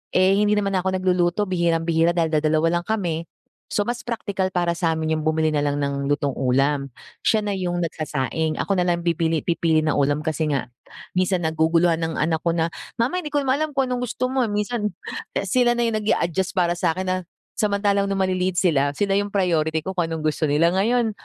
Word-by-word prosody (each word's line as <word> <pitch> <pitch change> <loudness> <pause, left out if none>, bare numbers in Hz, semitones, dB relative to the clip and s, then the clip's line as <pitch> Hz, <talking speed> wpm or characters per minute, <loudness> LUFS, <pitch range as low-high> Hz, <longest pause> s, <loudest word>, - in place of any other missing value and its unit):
Eh, 190 +2 +4
hindi 210 0 +3
naman 200 -1 0
na 190 - +2
ako 190 +1 -1
nagluluto 180 0 +1
bihirang-bihira 170 -2 +1
dahil 165 -2 +1
dadalawa 155 +2 +2
lang 175 - -10
kami, 175 -7 -2 0.4
so 205 - 0
mas 240 +3 -3
praktikal 200 -5 -2
para 175 -1 +2
sa 170 -1 0
amin 160 0 -2
iyung 155 -1 0
bumili 155 0 +2
na 150 - +1
lang 145 0 0
ng 140 0 -2
lutong 145 0 0
ulam. 135 +2 +1 0.4
Siya 220 -1 +3
na 205 - -2
iyung 175 -2 -1
nagsasaing, 155 -1 -2
ako 195 +3 0
na 180 - +1
lang 170 -1 0
bibili 165 -2 0
pipili 165 -2 +1
ng 155 - +1
ulam 145 +1 +1
kasi 160 0 -1
nga 140 -4 -2 0.4
minsan 185 -1 0
naguguluhan 165 +1 +2
ang 165 -1 -2
anak 160 +1 0
ko 170 +1 0
na, 165 0 0 0.2
"Mama 245 +10 0
hindi 335 - -6
ko 290 - +2
naman 265 +1 +1
alam 310 0 0
kung 265 -2 +1
anong 250 0 -1
gusto 255 +2 -2
mo" 260 -3 +1
minsan, 210 +1 -2 0.4
eh, - - 0
sila 245 -2 +2
na 240 - +1
iyung 225 -2 0
nag-a-adjust 190 -3 0
para 175 -2 +2
sa 165 -2 +1
akin 185 - -2
na 185 0 0 0.4
samantalang 200 -1 +1
noong 195 -1 -1
maliliit 185 0 0
sila, 145 -6 +2
sila 200 +5 0
iyung 200 +1 +2
priority 160 -4 +1
ko 190 - -3
kung 175 -3 -1
anong 160 -1 -4
gusto 155 0 0
nila. 155 +4 +3
Ngayon, 225 +5 +1
175 Hz, 210 wpm, -23 LUFS, 160-200 Hz, 0.4 s, Eh